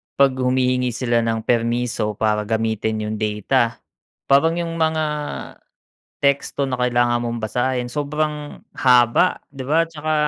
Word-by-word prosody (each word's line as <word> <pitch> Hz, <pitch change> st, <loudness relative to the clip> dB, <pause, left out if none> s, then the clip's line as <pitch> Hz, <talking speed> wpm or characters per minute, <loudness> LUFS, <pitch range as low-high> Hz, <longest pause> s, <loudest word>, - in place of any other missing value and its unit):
'pag 140 Hz, -1 st, +4 dB
humihingi 125 Hz, -1 st, +1 dB
sila 120 Hz, -1 st, 0 dB
ng 115 Hz, -1 st, -1 dB
permiso 120 Hz, -2 st, 0 dB
para 105 Hz, 0 st, +1 dB
gamitin 110 Hz, -1 st, -1 dB
'yung 105 Hz, 0 st, -3 dB
data, 115 Hz, +3 st, 0 dB, 0.5 s
parang 160 Hz, +4 st, +5 dB
'yung 165 Hz, -1 st, -3 dB
mga 160 Hz, -1 st, +1 dB, 1.2 s
teksto 140 Hz, 0 st, +1 dB
na 130 Hz, -, -1 dB
kailangan 120 Hz, -1 st, +2 dB
mong 120 Hz, 0 st, -3 dB
basahin 125 Hz, +2 st, -1 dB
sobrang 150 Hz, +1 st, -3 dB, 0.2 s
haba 125 Hz, +6 st, +4 dB
'di 135 Hz, -2 st, -7 dB
ba, 155 Hz, -, +2 dB
tsaka 155 Hz, -1 st, -3 dB
125 Hz, 130 wpm, -21 LUFS, 115-140 Hz, 1.2 s, parang